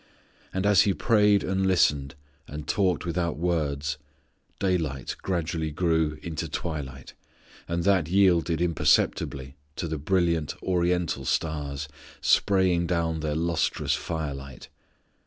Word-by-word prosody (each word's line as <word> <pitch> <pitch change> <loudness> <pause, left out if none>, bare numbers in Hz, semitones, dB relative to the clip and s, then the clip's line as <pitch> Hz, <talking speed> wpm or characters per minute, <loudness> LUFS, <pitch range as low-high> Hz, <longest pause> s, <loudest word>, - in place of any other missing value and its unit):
And 95 +1 -2
as 100 -2 +6
He 100 -3 +2
prayed 105 -3 +3
and 95 0 0
listened 75 -6 +2 0.3
and 75 +1 -7
talked 95 -6 +1
without 85 -2 -1
words, 75 -4 -1 0.6
daylight 80 -9 -1
gradually 80 -3 -2
grew 80 -1 0
into 80 -2 -4
twilight, 70 -6 -5 0.5
and 85 0 -1
that 95 -4 +3
yielded 85 -3 +3
imperceptibly 70 -4 +1 0.2
to 85 - -3
the 80 -1 -3
brilliant 85 -2 0
Oriental 90 -5 0
stars 75 -1 -2 0.3
spraying 95 -3 +3
down 80 -2 0
their 75 -1 -2
lustrous 80 -3 0
fire 75 -1 -3
light. 70 -1 -10
85 Hz, 120 wpm, -26 LUFS, 75-90 Hz, 0.6 s, as